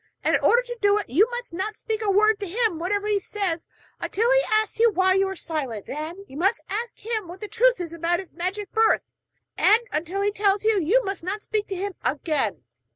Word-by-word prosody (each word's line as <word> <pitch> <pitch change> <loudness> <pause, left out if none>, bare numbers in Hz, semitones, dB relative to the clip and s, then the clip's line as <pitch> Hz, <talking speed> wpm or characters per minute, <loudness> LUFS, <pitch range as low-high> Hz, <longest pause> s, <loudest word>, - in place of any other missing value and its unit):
And - - +2
in - - +3
order 480 +1 +4
to 485 -1 -6
do 405 0 +4
it, 410 - -4
you 400 - +4
must 485 -6 -6
not 385 +5 -3
speak 440 0 -4
a 430 - 0
word 425 +2 +4
to 405 - -4
him 430 -3 0
whatever 405 +4 -1
he 420 -1 +2
says 380 -5 -3 0.3
until 460 +4 0
he - - +5
asks 435 0 +1
you 465 0 +6
why 375 -2 +3
you 385 +1 +2
are 385 - -4
silent; 270 - -4
then 325 +7 -6
you 270 - -10
must 390 +7 +2
ask 460 +4 -3
him 440 -4 -2
what 355 +2 -9
the 425 - -6
truth - - +3
is 335 -2 -5
about 335 +1 0
his 380 -1 -9
magic 375 +3 -4
birth; 445 0 +3 0.5
and 440 +3 +5
until 345 +6 -2
he 410 - +2
tells 405 0 +1
you, 435 -2 +3
you 425 +10 +3
must 390 -1 -3
not 390 +5 -4
speak 425 -1 -2
to 390 - -4
him 390 +2 -3
again.' 265 - -1
400 Hz, 230 wpm, -24 LUFS, 345-435 Hz, 0.5 s, you